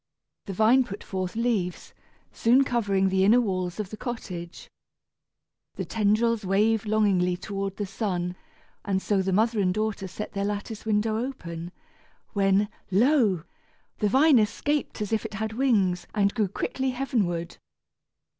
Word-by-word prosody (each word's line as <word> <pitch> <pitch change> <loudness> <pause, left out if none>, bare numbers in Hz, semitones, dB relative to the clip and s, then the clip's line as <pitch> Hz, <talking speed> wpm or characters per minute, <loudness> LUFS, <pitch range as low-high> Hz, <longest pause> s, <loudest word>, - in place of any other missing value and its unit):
The 195 - -4
vine 225 +7 +5
put 205 -4 -8
forth 185 -1 -4
leaves, 225 -6 -1 0.4
soon 250 +4 +4
covering 200 -6 +1
the 190 0 +2
inner 220 +5 +6
walls 185 -5 -2
of 205 -3 -4
the 215 - -6
cottage. 180 -8 -6 1.1
The - - -4
tendrils 225 +1 +1
waved 215 +3 +2
longingly 195 -4 +2
toward 195 0 -4
the 205 - -2
sun, 185 -3 -2 0.5
and 195 -2 0
so 195 0 +1
the 190 0 -1
mother 220 +3 +2
and 185 -2 +2
daughter 215 -1 -2
set 210 +3 -6
their 200 -1 -2
lattice 205 +2 -4
window 215 +1 +1
open, 170 -10 -6 0.6
when, 200 0 +3 0.2
lo! 210 - +3 0.6
the 210 - +2
vine 275 +3 +5
escaped 230 +3 -1
as 210 - -4
if 220 - +1
it - - -6
had 220 +1 -3
wings 205 -8 +1
and 200 -1 +2
grew 215 -4 +1
quickly 265 +7 -2
heavenward. 215 -10 -1
210 Hz, 145 wpm, -26 LUFS, 190-225 Hz, 1.1 s, inner